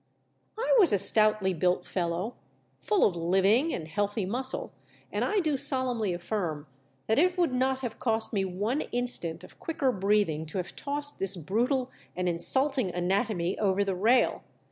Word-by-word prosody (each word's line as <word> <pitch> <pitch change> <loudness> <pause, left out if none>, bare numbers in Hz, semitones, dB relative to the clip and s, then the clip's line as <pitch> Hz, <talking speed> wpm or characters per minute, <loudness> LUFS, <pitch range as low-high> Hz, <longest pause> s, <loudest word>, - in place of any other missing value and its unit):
I - - +2
was 370 -7 +6
a 205 - +3
stoutly 210 -1 +2
built 180 +2 0
fellow, 180 +5 -2 0.5
full 420 -4 +2
of 190 - +1
living 195 - +2
and 155 - -4
healthy 205 +4 -1
muscle, 260 - -2 0.4
and - - -1
I 420 - +1
do 305 -4 0
solemnly 255 -6 -1
affirm 175 -4 -3 0.4
that 220 +4 +2
it 360 +3 +2
would 345 -7 +1
not 260 +1 0
have 245 -4 -5
cost 225 -1 0
me 195 -2 +1
one 205 +10 -2
instant 240 -9 -2
of - - -15
quicker 285 -5 -1
breathing 195 -6 0
to 165 - -6
have 180 - -5
tossed 290 0 -4
this 195 0 -1
brutal 245 - -1 0.2
and 180 0 -2
insulting 260 - +3
anatomy 180 +1 -1
over 200 -1 +2
the 195 -1 -1
rail. 225 +7 +2
210 Hz, 165 wpm, -28 LUFS, 185-260 Hz, 0.5 s, was